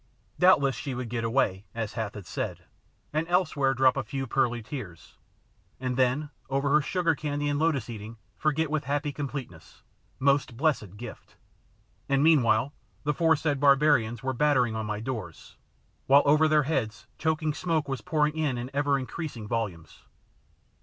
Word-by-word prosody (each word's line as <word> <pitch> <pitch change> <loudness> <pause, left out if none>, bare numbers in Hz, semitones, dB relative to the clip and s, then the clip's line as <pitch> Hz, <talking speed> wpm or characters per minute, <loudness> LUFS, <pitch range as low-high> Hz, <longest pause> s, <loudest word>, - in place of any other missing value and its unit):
Doubtless 140 -8 +5
she 135 +2 -5
would 125 -2 -4
get 115 0 -2
away, 105 -3 0
as 110 -3 -3
Hath 110 -2 -4
had 100 -3 -8
said, - - -4 0.5
and 155 +2 0
elsewhere 155 -7 +1
drop 130 0 +4
a 135 - -1
few 135 +4 -4
pearly 120 -1 0
tears 105 - -9 0.6
and 125 -1 -2
then 130 +4 +1 0.2
over 140 +1 0
her 150 +1 +5
sugar 170 +2 +1
candy 145 -1 -2
and 145 0 0
lotus 155 -7 +1
eating 110 -1 -8 0.2
forget 155 0 0
with 155 -3 -1
happy 145 +2 -1
completeness 135 - -7 0.3
most 140 -3 +1
blessed 125 - 0
gift! 120 +3 -10 0.7
And 135 0 +3
meanwhile 135 -4 +4 0.3
the 150 0 +1
foresaid 155 -2 +2
barbarians 140 -5 +3
were 130 0 -1
battering 125 -4 +2
on 110 -1 -3
my 105 0 -3
doors, 110 -10 -6 0.5
while 140 +2 +6
over 150 +2 +5
their 155 -1 +4
heads 130 -7 -2
choking 155 -1 0
smoke 160 -2 -1
was 135 -1 -3
pouring 155 -3 +1
in 150 -5 0
in 120 +2 -5
ever 140 0 +2
increasing 130 -4 -6
volumes. 100 -8 -4
135 Hz, 160 wpm, -27 LUFS, 115-150 Hz, 0.7 s, while